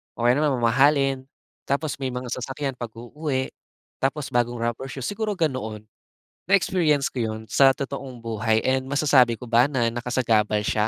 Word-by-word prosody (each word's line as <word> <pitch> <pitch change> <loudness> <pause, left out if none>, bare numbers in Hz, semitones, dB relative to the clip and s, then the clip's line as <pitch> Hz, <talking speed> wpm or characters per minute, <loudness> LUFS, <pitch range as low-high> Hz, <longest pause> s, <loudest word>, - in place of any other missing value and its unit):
o 120 0 0
kaya 125 - +5
naman 145 -3 +1
mamahalin. 135 +3 +3 0.4
Tapos 140 +1 -1
may 135 -2 -3
mga 125 0 -5
sasakyan 135 +2 -4
pag-uuwi, 130 +4 -4 0.6
tapos 135 0 0
bagong 120 -2 0
rubber 120 +3 -3
shoes, 135 -2 -5
siguro 210 +1 -2
ganoon. 110 -8 -2 0.6
Na-experience 175 -6 +2
ko 130 - -5
'yon 110 -1 -2
sa 135 -1 +5
totoong 135 -3 -6
buhay 110 -1 0
and 130 0 0
masasabi 135 -4 +4
ko 125 - -12
ba 120 +2 +4
na 120 -5 0
nakasagabal 115 -3 +1
siya? 105 +1 +1
130 Hz, 155 wpm, -24 LUFS, 115-140 Hz, 0.6 s, kaya